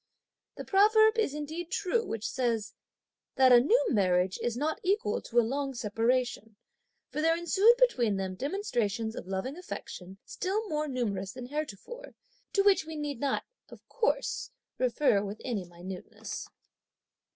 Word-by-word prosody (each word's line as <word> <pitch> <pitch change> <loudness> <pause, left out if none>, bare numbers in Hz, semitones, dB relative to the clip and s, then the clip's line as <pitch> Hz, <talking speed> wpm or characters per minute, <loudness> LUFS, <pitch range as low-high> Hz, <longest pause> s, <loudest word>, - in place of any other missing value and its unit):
The - - -6
proverb 435 +3 +5
is 295 -10 +1
indeed 315 +3 -5
true 405 +4 0
which 225 - -4
says: 230 -4 -1 0.6
"That 260 -1 +6
a 245 - +9
new 370 - +3
marriage 185 -3 +2
is 240 -1 -1
not 310 +4 -1
equal 380 - 0
to 240 - +1
a 235 - +3
long 270 +2 -2
separation," 230 0 -1 0.6
for 305 - -2
there 330 +1 +3
ensued 390 +7 +5
between 250 - +3
them 190 -1 -3
demonstrations 235 - -2
of - - -7
loving 195 - -3
affection 190 - -8
still 415 +4 -2
more 305 -3 -1
numerous 205 -8 -2
than 255 -1 -7
heretofore, 305 - -6 0.4
to 395 - +3
which 395 -4 +5
we 320 0 -8
need 295 -4 -4
not, 275 0 0 0.3
of - - -15
course, - - -1 0.3
refer 245 -4 +2
with 205 +1 -6
any 220 -8 -2
minuteness. 175 +2 -8
260 Hz, 150 wpm, -30 LUFS, 215-345 Hz, 0.6 s, a